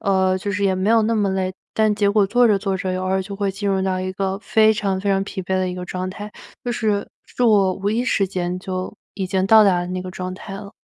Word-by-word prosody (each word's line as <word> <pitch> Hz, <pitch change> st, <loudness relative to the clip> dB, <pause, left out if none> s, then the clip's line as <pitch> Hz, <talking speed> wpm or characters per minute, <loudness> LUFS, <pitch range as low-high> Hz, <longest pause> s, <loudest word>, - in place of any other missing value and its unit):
呃， 190 Hz, -1 st, +2 dB
就 200 Hz, +2 st, -3 dB
是 200 Hz, +1 st, -2 dB
也 195 Hz, -, +3 dB
没 185 Hz, +2 st, -1 dB
有 225 Hz, -1 st, +5 dB
那 225 Hz, +2 st, +1 dB
么 205 Hz, -2 st, +1 dB
累。 190 Hz, -1 st, -1 dB, 0.2 s
但 215 Hz, -1 st, +3 dB
结 205 Hz, -1 st, +1 dB
果 205 Hz, 0 st, +3 dB
做 245 Hz, +5 st, +3 dB
着 210 Hz, -3 st, +4 dB
做 195 Hz, -1 st, -1 dB
着 185 Hz, 0 st, -2 dB
偶 -, -, -2 dB
尔 190 Hz, +1 st, +1 dB
就 200 Hz, +1 st, -6 dB
会 200 Hz, 0 st, -1 dB
进 200 Hz, +1 st, -3 dB
入 190 Hz, -1 st, +1 dB
到 185 Hz, -1 st, 0 dB
一 185 Hz, 0 st, -3 dB
个 195 Hz, 0 st, -2 dB
非 215 Hz, +2 st, +3 dB
常 200 Hz, -3 st, -1 dB
非 200 Hz, 0 st, 0 dB
常 195 Hz, 0 st, +1 dB
疲 190 Hz, -1 st, -5 dB
惫 190 Hz, +1 st, -1 dB
的 185 Hz, -1 st, 0 dB
一 180 Hz, -, -4 dB
个 180 Hz, -, -5 dB
状 185 Hz, +1 st, -4 dB
态 205 Hz, +3 st, -7 dB, 0.3 s
就 245 Hz, -, -1 dB
是， 215 Hz, -4 st, -1 dB, 0.2 s
是 250 Hz, -, -4 dB
我 205 Hz, -5 st, +4 dB
无 200 Hz, +1 st, -2 dB
意 235 Hz, +3 st, 0 dB
识 200 Hz, -5 st, +1 dB
间 180 Hz, -1 st, -2 dB
就 185 Hz, -1 st, -5 dB, 0.2 s
已 190 Hz, -, -3 dB
经 190 Hz, 0 st, 0 dB
到 220 Hz, +2 st, +7 dB
达 185 Hz, -3 st, +3 dB
了 175 Hz, -, -4 dB
那 185 Hz, 0 st, -3 dB
个 185 Hz, -, -7 dB
状 185 Hz, 0 st, -5 dB
态 195 Hz, +1 st, -8 dB
了。 200 Hz, 0 st, -8 dB
195 Hz, 305 characters per minute, -21 LUFS, 185-205 Hz, 0.3 s, 到